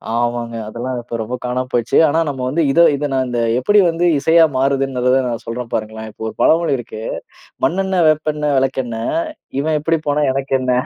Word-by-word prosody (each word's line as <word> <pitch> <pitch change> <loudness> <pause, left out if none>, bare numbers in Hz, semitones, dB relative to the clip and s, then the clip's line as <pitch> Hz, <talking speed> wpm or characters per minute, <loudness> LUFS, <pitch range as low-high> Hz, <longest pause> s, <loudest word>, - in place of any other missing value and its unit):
ஆமாங்க. 120 -1 -2
அதெல்லாம் 120 +3 -4
இப்போ 120 0 -7
ரொம்ப 120 +3 -4
காணாம 125 +1 -2
போயிருச்சு. 120 -2 +1
ஆனா 160 +3 +1
நம்ம 130 -2 -5
வந்து 165 +4 +1
இதை 170 +4 +5
இதை 145 +1 -2
நான் 130 -1 +1
இந்த 120 -1 -1 0.2
எப்படி 205 +10 +3
வந்து 170 +2 0
இசையா 165 +2 +5
மாறுதுன்ங்கறத 135 -1 +1
நான் 115 -1 -4
சொல்றேன் 115 +1 -5
பாருங்களேன். 110 0 -4
இப்போ 110 - -8
ஒரு - - -6
பழமொழி 165 -3 +3
இருக்கு, 110 -2 -8 0.6
"மண்ணெண்ணெ, 190 +4 +1
வேப்பெண்ணெ, 150 -1 0
வெளக்கெண்ணெ. 125 -4 -2 0.6
இவன் 155 +1 0
எப்படி 165 0 +1
போனா 145 +1 +1
எனக்கென்ன?". 130 -1 -1
130 Hz, 170 wpm, -18 LUFS, 120-150 Hz, 0.6 s, இதை